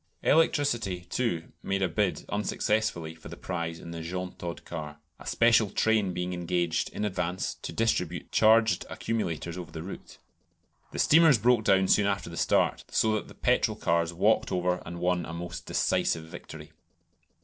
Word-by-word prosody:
Electricity, 130 - +2
too, 90 -2 -2
made 95 0 -1
a - - +3
bid 95 +3 -1
unsuccessfully 105 -4 -1
for 80 0 -12
the 85 - -9
prize 85 -2 -4
in 85 - -9
the 85 -1 -6
Jeantaud 90 0 -5
car, 75 -3 -6 0.2
a - - -12
special 115 -2 +4
train 110 -3 +2
being 90 0 -3
engaged 85 -1 -1
in 105 - -3
advance 90 -2 -2
to - - -5
distribute 90 -6 -1
charged 110 -3 +4
accumulators 85 -6 -3
over 90 - -8
the 80 - -6
route. 95 - -9 0.7
The - - -7
steamers 160 -3 +6
broke 115 0 +3
down 95 -1 +4
soon 105 +1 +4
after 100 -3 -2
the - - -7
start, - - +2
so 110 -1 +2
that 110 - -2
the - - -14
petrol - - +1
cars 85 0 +1
"walked 105 +6 +2
over" 90 0 0
and 85 0 -6
won 90 0 +1
a 85 - -7
most 85 +1 -7
decisive 80 - +1
victory. 80 - -10
90 Hz, 165 wpm, -28 LUFS, 85-110 Hz, 0.7 s, steamers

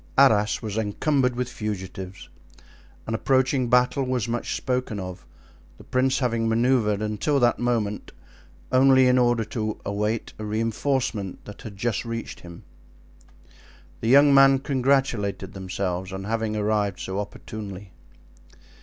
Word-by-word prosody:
Arras 110 -7 +4
was 110 -1 -4
encumbered 125 +4 0
with 125 0 -2
fugitives. 95 -4 -6 0.8
An 110 - -3
approaching 130 +1 +1
battle 125 +3 +3
was 125 -3 -1
much 120 0 -2
spoken 125 -5 -2
of, 90 -1 -8 0.5
the - - -14
prince 130 +1 +1
having 115 -4 0
manoeuvred, 115 -3 +2
until 110 +7 0
that 120 -1 +2
movement, 115 -4 -1 0.6
only 130 0 +6
in 125 0 +4
order 120 -2 +2
to 110 -1 -3
await 105 +2 -2
a - - -5
reinforcement 110 -1 -2
that 105 - -10
had 105 -3 -9
just 115 0 -1
reached 115 -1 -5
him. 85 -1 -12 1.4
The 115 - -3
young 140 +2 +7
men 135 0 +7
congratulated 130 - 0
themselves 95 -1 -3
on 95 0 -5
having 110 +1 -2
arrived 105 -2 0
so 95 +1 -4
opportunely. 100 -2 -7
115 Hz, 130 wpm, -24 LUFS, 105-130 Hz, 1.4 s, young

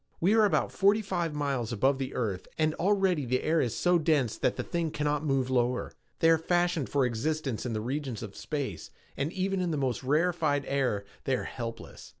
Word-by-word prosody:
"We 185 +5 +3
are 220 -1 +5
about 200 - +1
forty 205 +2 +3
five 175 -6 -2
miles 135 -6 -1
above 135 +5 +2
the 135 0 -4
earth 100 -7 -2
and 155 -1 +2
already 190 -4 +2
the 130 0 0
air 160 +1 +2
is 120 - -1
so 175 -1 +3
dense 150 -8 +2
that - - 0
the - - -3
thing 170 -2 -2
cannot 150 0 -1
move 135 -3 0
lower. 125 0 +1 0.3
They 165 - +6
are 165 - +4
fashioned 175 -3 +1
for 140 -2 +2
existence 130 +1 -2
in 120 - -3
the 110 - -2
regions 130 -1 -3
of 105 -3 -8
space 140 - -4 0.3
and 140 +3 -2
in - - -12
even 190 -1 0
the 155 - -1
most 130 -5 -1
rarified 150 0 +1
air 125 -8 0 0.2
they 135 - +2
are - - -3
helpless. 115 -2 -7
145 Hz, 205 wpm, -29 LUFS, 125-165 Hz, 0.3 s, They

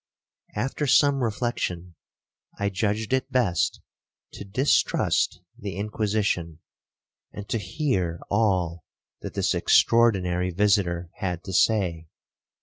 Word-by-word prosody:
After 135 +6 -2
some 140 0 +4
reflection, 105 -7 -2 0.6
I 100 0 0
judged 105 +4 -1
it 130 +1 0
best 115 -10 +1 0.5
to - - -8
distrust 100 -4 +1 0.2
the 100 -6 -5
Inquisition, 105 -5 -1 0.7
and 105 -1 -8
to 115 - 0
hear 90 - -1
all 90 -6 +1 0.4
that - - -7
this - - +1
extraordinary 95 -6 +3
visitor 90 -3 +1
had 90 -2 -3
to 95 - -7
say. 90 -7 +1
100 Hz, 105 wpm, -25 LUFS, 90-115 Hz, 0.7 s, some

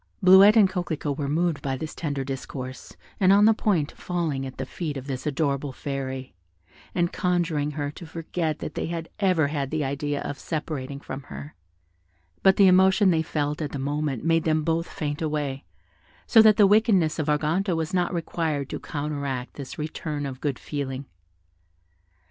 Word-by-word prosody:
Bleuette 190 +3 +8
and 210 -3 +7
Coquelicot 170 -6 -3
were 140 -1 -3
moved 165 0 0
by 135 -1 -2
this 155 +3 -6
tender 145 -4 -3
discourse, 130 -1 -7 0.2
and 190 -1 +5
on 205 +1 +6
the 225 - +6
point 180 -9 0
of - - -23
falling 160 -7 -2
at 130 - -10
the 130 - -3
feet 150 +1 -4
of 135 - -7
this 135 +1 -4
adorable 140 -1 -1
fairy, 130 -2 -5 0.6
and 175 -1 +1
conjuring 170 -5 0
her 145 -1 -2
to 165 +2 -10
forget 165 -1 -3
that 155 - -6
they - - -3
had 165 -1 -4
ever 180 -7 +2
had 140 -3 -2
the 155 0 -1
idea 145 +1 -2
of 140 - -5
separating 145 -3 -4
from 135 -1 -7
her; 145 - -8 0.9
but 190 0 +5
the 200 - +6
emotion 190 +1 +5
they 160 -2 +2
felt 150 -1 -2
at 150 - -4
the - - -2
moment 145 -1 -2
made 165 0 +2
them 155 -1 +1
both 165 +1 0
faint 145 -1 -4
away, 145 -3 -2 0.6
so 225 - +7
that 215 -1 +6
the 205 - +7
wickedness 195 -6 +3
of 155 - -1
Arganto 165 +5 +1
was 160 +1 -2
not 180 -1 +1
required 160 -4 -2
to - - -4
counteract 140 -4 -4
this 140 -2 -8
return 150 -1 -4
of 130 -2 -6
good 145 -4 -1
feeling. 140 -2 -4
150 Hz, 180 wpm, -25 LUFS, 140-175 Hz, 0.9 s, Bleuette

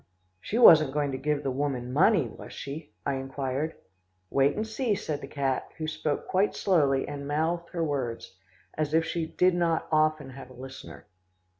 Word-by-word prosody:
"She 215 - -3
wasn't 155 - +8
going 145 -1 0
to 130 - -4
give 150 +1 -1
the 135 - -1
woman 130 -2 -2
money, 170 - +4
was 110 - -11
she?" 145 +2 -7
I 140 -1 0
inquired. 135 +3 -3 0.6
"Wait 140 +1 +3
and 215 - -2
see," 220 0 -1
said 150 -6 -4
the - - -7
cat, 135 -2 -1
who 160 - -3
spoke 155 -1 -2
quite 195 +2 +1
slowly 145 -8 +2
and 140 -1 -6
mouthed 165 +4 -1
her 170 -2 -2
words, 130 -10 -3 0.4
as 155 0 -1
if 165 0 +3
she 165 0 -2
did 180 +3 +2
not 170 -2 0
often 155 -2 +2
have 130 0 -10
a - - -13
listener. 130 +1 -10
150 Hz, 180 wpm, -28 LUFS, 135-165 Hz, 0.6 s, wasn't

